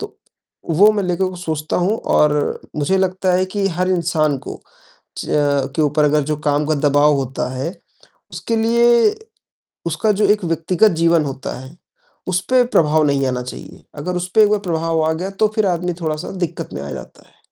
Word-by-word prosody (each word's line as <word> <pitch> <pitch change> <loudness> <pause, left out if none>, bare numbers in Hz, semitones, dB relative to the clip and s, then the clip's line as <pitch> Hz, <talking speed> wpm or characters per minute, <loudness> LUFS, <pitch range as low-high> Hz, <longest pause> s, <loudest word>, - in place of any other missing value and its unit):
तो - - -8 0.5
वो 200 +7 +6
मैं 205 - -1
लेकर 185 +1 -1
सोचता 155 -3 -3
हूँ 190 +5 +1 0.2
और 150 -1 +2 0.2
मुझे 150 +6 +1
लगता 185 0 0
है 185 +1 +2
कि 200 - +1
हर 185 - +1
इंसान 160 -5 +1
को, - - -9 0.6
च - - -5
अ, 145 -2 +1
के 155 - +1
ऊपर 150 +1 +2
अगर 150 +1 +2
जो 150 - -1
काम 145 +1 +1
का 155 - +1
दबाव 145 +1 +4
होता 135 -2 -3
है, 135 +7 -3 0.6
उसके 230 - -3
लिए 235 - +3 0.7
उसका 170 +6 +1
जो 205 +1 +1
एक 210 -2 +2
व्यक्तिगत 165 +5 +2
जीवन 170 -2 +3
होता 135 -3 -5
है, 130 +5 -12 0.5
उस 185 0 +1
पर 255 -1 +5
प्रभाव 155 -8 +2
नहीं 140 -1 +1
आना 125 -1 -2
चाहिए, 125 - -10
अगर 180 +5 -4
उस 180 0 -3
पे 220 - +7
एक - - +3
बार 210 - +2
प्रभाव 165 -2 0
आ 160 - +1
गया 175 +4 -4
तो 215 - +5
फिर 215 - +2
आदमी 180 -1 -1
थोड़ा-सा 155 0 -3 0.2
दिक्कत 165 - -8
में - - -5
आ 70 - -6
जाता - - -11
है। - - -30
165 Hz, 195 wpm, -19 LUFS, 150-190 Hz, 0.7 s, पे